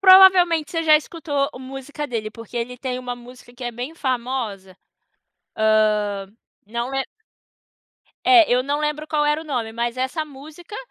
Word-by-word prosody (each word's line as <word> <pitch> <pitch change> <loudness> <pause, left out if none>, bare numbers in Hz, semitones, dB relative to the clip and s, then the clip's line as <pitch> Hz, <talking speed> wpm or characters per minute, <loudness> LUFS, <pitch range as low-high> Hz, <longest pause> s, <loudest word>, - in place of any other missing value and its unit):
Provavelmente 370 -4 +7
você 330 -1 -1
já 310 -1 +7
escutou 290 -3 -2
música 270 +3 -6
dele, 220 -4 -3
porque 230 +1 -10
ele 245 +1 -3
tem 255 -1 -3
uma 250 -1 -4
música 245 0 -14
que 245 - -11
é 240 - -2
bem 250 +7 -6
famosa, 235 - -3 0.8
hã, 210 -2 +2 0.4
não 235 +3 -3
lem 270 0 -1 1.2
É, 365 -4 +7
eu 250 +1 +3
não 285 +2 -1
lembro 300 0 -2
qual 295 -1 +1
era 300 +1 +2
o - - -9
nome, 245 -7 -3
mas 235 +1 -2
essa 260 +5 -1
música 310 +7 -11
260 Hz, 160 wpm, -22 LUFS, 235-305 Hz, 1.2 s, Provavelmente